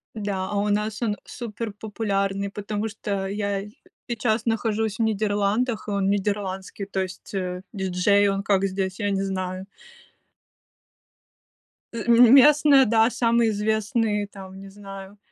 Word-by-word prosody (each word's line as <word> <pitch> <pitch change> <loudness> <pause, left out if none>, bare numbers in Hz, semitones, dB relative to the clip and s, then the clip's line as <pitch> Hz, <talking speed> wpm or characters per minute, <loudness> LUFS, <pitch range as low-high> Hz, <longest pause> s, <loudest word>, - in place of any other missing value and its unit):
Да, 200 -3 -3
а 205 - -1
у 205 +1 0
нас 210 +2 -1
он 210 -3 0
суперпопулярный, 205 -3 -3
потому 210 +1 -3
что 200 -2 -4
я 200 0 -2 0.4
сейчас 235 -1 -1
нахожусь 225 -1 -1
в - - +1
Нидерландах, 215 +2 0
и - - -3
он 200 -1 0
нидерландский, 200 -1 -2
то 195 -1 -2
есть, 185 +2 -7
э, 180 -1 -3
диджей. 195 +1 +2
Он 195 0 -1
как 195 -1 +2
здесь, 190 0 -3
я 205 -1 0
не 195 0 0
знаю. 185 -1 -3 2.3
Ы 230 -2 -5
М 235 +1 +7
местные, 285 -1 +6
да, 225 +1 +4
самые 235 -1 +2
известные, 210 0 0
там, 190 -1 -11
не 195 - -10
знаю, 195 0 -10
205 Hz, 135 wpm, -24 LUFS, 195-220 Hz, 2.3 s, М